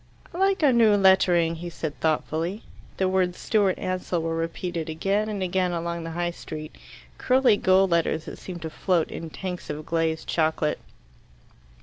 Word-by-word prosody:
"I 345 Hz, -, -6 dB
like 390 Hz, -2 st, +2 dB
our 275 Hz, -3 st, +5 dB
new 225 Hz, -3 st, +5 dB
lettering," 180 Hz, -4 st, +4 dB
he 175 Hz, +1 st, -6 dB
said 160 Hz, -3 st, -5 dB
thoughtfully. 160 Hz, +5 st, -1 dB, 0.3 s
The 190 Hz, -, +1 dB
words 185 Hz, -1 st, +1 dB
"Stewart 200 Hz, -4 st, +1 dB
Ansell" 185 Hz, -2 st, -2 dB
were 165 Hz, 0 st, -1 dB
repeated 165 Hz, 0 st, -3 dB
again 195 Hz, +7 st, 0 dB
and 205 Hz, -3 st, -3 dB
again 185 Hz, 0 st, 0 dB
along 170 Hz, 0 st, -3 dB
the -, -, -4 dB
High 175 Hz, 0 st, 0 dB
Street 155 Hz, -2 st, -8 dB, 0.4 s
curly 255 Hz, -3 st, +4 dB
gold 190 Hz, -1 st, +3 dB
letters 165 Hz, -1 st, +1 dB
that -, -, -8 dB
seemed 175 Hz, -3 st, -8 dB
to 160 Hz, -, -5 dB
float 175 Hz, -1 st, 0 dB
in 165 Hz, -, -6 dB
tanks 180 Hz, +2 st, -6 dB
of 150 Hz, +1 st, -5 dB
glazed 165 Hz, -1 st, -1 dB
chocolate. 155 Hz, -2 st, 0 dB
175 Hz, 165 wpm, -25 LUFS, 165-190 Hz, 0.4 s, our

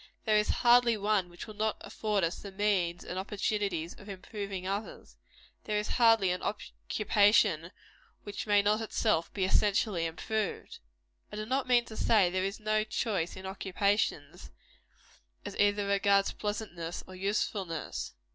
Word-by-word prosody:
There 215 Hz, -2 st, +4 dB
is 210 Hz, -, +1 dB
hardly 240 Hz, -1 st, +4 dB
one 205 Hz, -3 st, +1 dB
which 175 Hz, 0 st, -9 dB
will 215 Hz, -, -9 dB
not 215 Hz, +1 st, -1 dB
afford 210 Hz, -3 st, -1 dB
us 165 Hz, +1 st, -1 dB
the 200 Hz, -, -9 dB
means 190 Hz, -4 st, 0 dB
and 185 Hz, -, -4 dB
opportunities 195 Hz, -4 st, -2 dB
of 205 Hz, -, -14 dB
improving 195 Hz, -1 st, -6 dB
others. 200 Hz, +3 st, -5 dB, 0.5 s
There 210 Hz, -1 st, -1 dB
is 210 Hz, -, -2 dB
hardly 225 Hz, -6 st, +4 dB
an 180 Hz, -, -2 dB
occupation 205 Hz, -5 st, +1 dB, 0.5 s
which 205 Hz, +1 st, -6 dB
may 205 Hz, -1 st, +4 dB
not 210 Hz, +2 st, +2 dB
itself 215 Hz, -6 st, 0 dB
be 190 Hz, -2 st, -1 dB
essentially 195 Hz, -3 st, +2 dB
improved. 210 Hz, +5 st, -3 dB, 0.5 s
I -, -, -7 dB
do 215 Hz, 0 st, -4 dB
not 260 Hz, +3 st, -1 dB
mean 240 Hz, -1 st, +4 dB
to 220 Hz, -, -10 dB
say 205 Hz, -5 st, +3 dB
there 185 Hz, 0 st, 0 dB
is 195 Hz, +3 st, -3 dB
no 215 Hz, 0 st, +1 dB
choice 215 Hz, -5 st, -2 dB
in 190 Hz, -, -9 dB
occupations, 200 Hz, +2 st, -1 dB, 1.0 s
either 205 Hz, 0 st, +1 dB
as 200 Hz, -, -3 dB
regards 200 Hz, 0 st, +3 dB
pleasantness 205 Hz, -6 st, -5 dB
or 185 Hz, -, -12 dB
usefulness. 190 Hz, -3 st, -3 dB
205 Hz, 150 wpm, -30 LUFS, 185-215 Hz, 1.0 s, There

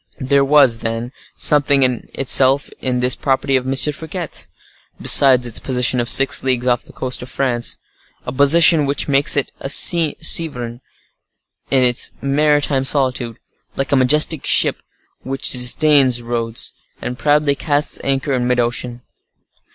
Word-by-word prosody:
There 140 Hz, 0 st, 0 dB
was, 135 Hz, -5 st, +2 dB
then, 115 Hz, +2 st, -5 dB, 0.3 s
something 140 Hz, -2 st, +2 dB
in 125 Hz, -2 st, -3 dB
itself 135 Hz, +1 st, +2 dB
in 125 Hz, -1 st, -2 dB
this 125 Hz, 0 st, +1 dB
property 135 Hz, 0 st, -2 dB
of 130 Hz, 0 st, -2 dB
M. 135 Hz, -, -2 dB
Fouquet's, 155 Hz, +4 st, -2 dB, 0.5 s
besides 130 Hz, -3 st, +4 dB
its 120 Hz, -2 st, -2 dB
position 125 Hz, -1 st, -1 dB
of 120 Hz, -, -2 dB
six 135 Hz, +1 st, +4 dB
leagues 130 Hz, -2 st, -2 dB
off 120 Hz, -1 st, -1 dB
the -, -, -16 dB
coast 130 Hz, -1 st, -6 dB
of 125 Hz, -, -10 dB
France; 120 Hz, -3 st, -2 dB, 0.5 s
a -, -, -6 dB
position 150 Hz, +3 st, +3 dB
which 140 Hz, 0 st, -3 dB
makes 140 Hz, 0 st, +3 dB
it 140 Hz, -, -1 dB
a 135 Hz, -, -7 dB
sovereign 150 Hz, -7 st, +2 dB, 0.9 s
in 130 Hz, -2 st, +2 dB
its 120 Hz, -1 st, +1 dB
maritime 145 Hz, -1 st, 0 dB
solitude, 130 Hz, -4 st, -2 dB, 0.4 s
like 135 Hz, -, -4 dB
a -, -, +2 dB
majestic 150 Hz, +3 st, +1 dB
ship -, -, +1 dB, 0.4 s
which 135 Hz, +1 st, -3 dB
disdains 130 Hz, 0 st, +2 dB
roads, 115 Hz, -1 st, -4 dB, 0.3 s
and 125 Hz, 0 st, -7 dB
proudly 150 Hz, -1 st, +1 dB
casts 145 Hz, +1 st, -1 dB
anchor 135 Hz, +1 st, -1 dB
in 125 Hz, -1 st, -2 dB
mid 125 Hz, 0 st, -1 dB
ocean. 120 Hz, 0 st, -3 dB
135 Hz, 145 wpm, -16 LUFS, 125-145 Hz, 0.9 s, besides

